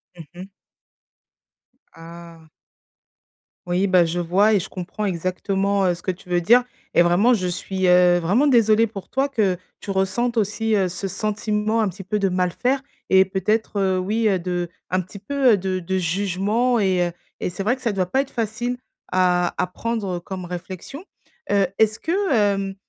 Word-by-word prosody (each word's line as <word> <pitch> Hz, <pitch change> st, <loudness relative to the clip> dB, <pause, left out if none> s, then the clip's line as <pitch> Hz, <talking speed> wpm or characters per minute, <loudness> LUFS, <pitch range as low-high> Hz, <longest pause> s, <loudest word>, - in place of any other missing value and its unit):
Mmh 165 Hz, -, -10 dB
mh. 180 Hz, +2 st, -9 dB, 1.5 s
Ah. 165 Hz, -1 st, -13 dB, 1.2 s
Oui 180 Hz, +3 st, +1 dB
bah 180 Hz, -2 st, +4 dB
je 170 Hz, +2 st, -2 dB
vois 195 Hz, +6 st, +3 dB
et 200 Hz, -, +4 dB
je -, -, -6 dB
comprends 195 Hz, +3 st, -5 dB
exactement, 195 Hz, +2 st, -1 dB
heu, 175 Hz, -, +1 dB
ce 175 Hz, -, -15 dB
que 185 Hz, -, 0 dB
tu 180 Hz, 0 st, -14 dB
veux 175 Hz, 0 st, +2 dB
dire 240 Hz, +8 st, +5 dB, 0.3 s
et -, -, +5 dB
vraiment 180 Hz, +8 st, +4 dB
je 185 Hz, -5 st, 0 dB
suis, 185 Hz, +1 st, -2 dB
heu, 180 Hz, 0 st, +5 dB
vraiment 200 Hz, -, +2 dB
désolée 230 Hz, -4 st, +4 dB
pour 200 Hz, -4 st, -9 dB
toi 270 Hz, +2 st, 0 dB
que 210 Hz, -9 st, 0 dB, 0.2 s
tu -, -, -10 dB
ressentes 195 Hz, +5 st, 0 dB
aussi, 220 Hz, +1 st, 0 dB
heu, 190 Hz, -2 st, +2 dB
ce 195 Hz, +2 st, -5 dB
sentiment 210 Hz, +2 st, -1 dB
un 210 Hz, -, +1 dB
petit 195 Hz, +2 st, -9 dB
peu 210 Hz, +3 st, -2 dB
de 195 Hz, -1 st, +1 dB
mal 180 Hz, -1 st, 0 dB
faire 260 Hz, +7 st, -1 dB, 0.3 s
et 190 Hz, 0 st, +6 dB
peut-être, 200 Hz, +3 st, -1 dB
heu, 190 Hz, -1 st, +1 dB
oui 210 Hz, +5 st, -1 dB
de 175 Hz, -1 st, -3 dB, 0.2 s
un 185 Hz, +1 st, +1 dB
petit 185 Hz, +3 st, -11 dB
peu 255 Hz, +1 st, +2 dB
de 185 Hz, 0 st, -2 dB
de 190 Hz, +2 st, -2 dB
jugement 200 Hz, +7 st, 0 dB
et 185 Hz, -3 st, +2 dB
heu 175 Hz, -, -5 dB, 0.3 s
et -, -, -2 dB
c'est 195 Hz, +2 st, -5 dB
vrai 240 Hz, +5 st, +2 dB
que 260 Hz, -, -18 dB
ça 235 Hz, -, 0 dB
doit 190 Hz, -2 st, 0 dB
pas 265 Hz, +9 st, +1 dB
être 275 Hz, -, -7 dB
facile 240 Hz, +2 st, -2 dB, 0.3 s
à 180 Hz, -1 st, +2 dB
à -, -, +1 dB
prendre 195 Hz, -2 st, -3 dB
comme 185 Hz, 0 st, -7 dB
réflexion, 185 Hz, -, -8 dB, 0.5 s
heu, 200 Hz, -1 st, +4 dB
est-ce 220 Hz, 0 st, +3 dB
que, 380 Hz, +1 st, -1 dB
hem 195 Hz, -3 st, +1 dB
195 Hz, 185 wpm, -22 LUFS, 180-220 Hz, 1.5 s, et